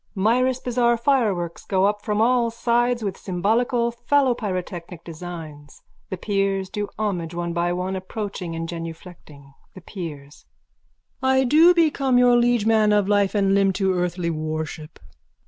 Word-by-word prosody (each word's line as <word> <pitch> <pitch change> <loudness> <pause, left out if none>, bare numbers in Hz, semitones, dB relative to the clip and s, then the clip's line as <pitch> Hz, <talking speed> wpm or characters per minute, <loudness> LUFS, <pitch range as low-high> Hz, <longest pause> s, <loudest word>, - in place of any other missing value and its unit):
Mirus 245 +6 +2
bazaar 240 -1 +1
fireworks 215 -10 0
go 190 -1 +1
up 205 +1 0
from 210 0 0
all 240 0 +3
sides 235 +1 0
with 200 -2 -4
symbolical 235 +6 0
phallopyrotechnic 210 - -1
designs. 160 -3 -9 0.3
The 190 - -4
peers 195 -1 -1
do 205 -1 -3
homage, 180 -6 -3
one 170 0 -3
by 170 +1 0
one, 180 +2 -2
approaching 190 -3 -5
and 165 0 -4
genuflecting.)_ 165 -4 -10 0.2
THE 185 - -11
PEERS: 150 -6 -9 0.7
I 265 0 +3
do 320 +7 +5
become 280 -6 +2
your 245 0 +5
liege 240 -2 +2
man 220 -1 +3
of 205 -2 +2
life 205 0 +2
and 195 -1 +2
limb 195 -1 +3
to 190 0 0
earthly 175 -1 -1
worship. 155 0 -5
195 Hz, 145 wpm, -23 LUFS, 175-235 Hz, 0.7 s, do